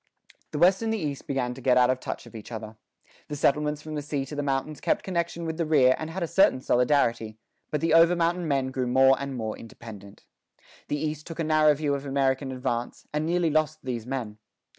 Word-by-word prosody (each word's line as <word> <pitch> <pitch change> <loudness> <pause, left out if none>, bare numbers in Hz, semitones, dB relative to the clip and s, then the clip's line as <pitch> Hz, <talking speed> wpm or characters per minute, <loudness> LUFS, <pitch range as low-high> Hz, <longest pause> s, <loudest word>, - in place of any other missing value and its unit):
The - - -5
West 185 +5 +4
and 225 -1 -1
the 225 - 0
East 145 -7 -4
began 125 -3 -1
to 130 - -11
get 125 0 +3
out 125 0 +5
of 130 - -2
touch - - -6
of - - -14
each 110 +1 -10
other. 110 -1 -7 0.5
The 150 - -5
settlements 150 +1 +1
from 155 - -7
the 150 - -2
sea 145 -1 -3
to 150 - -8
the 145 - -1
mountains 140 +2 -2
kept - - 0
connection 170 -2 -2
with 160 -1 -3
the 165 - 0
rear 135 -5 +5
and 155 - -4
had 175 +2 -4
a - - -1
certain 190 -6 +4
solidarity. 120 -4 +1 0.3
But 150 - -2
the 165 -1 +1
over 165 +2 +6
mountain 170 0 0
men 135 -3 0
grew 130 -1 -2
more 130 +2 +5
and 140 -1 -4
more 110 -3 -3
independent. 105 -3 -12 0.6
The 145 - -1
East 150 0 -4
took 165 - -7
a - - +1
narrow 155 -1 +4
view 145 -1 -1
of 140 0 -4
American 135 0 0
advance, 120 -2 -3
and 150 +1 -1
nearly 170 -1 +1
lost 155 0 0
these 120 -3 -4
men. 120 -5 -4
140 Hz, 225 wpm, -26 LUFS, 130-155 Hz, 0.6 s, over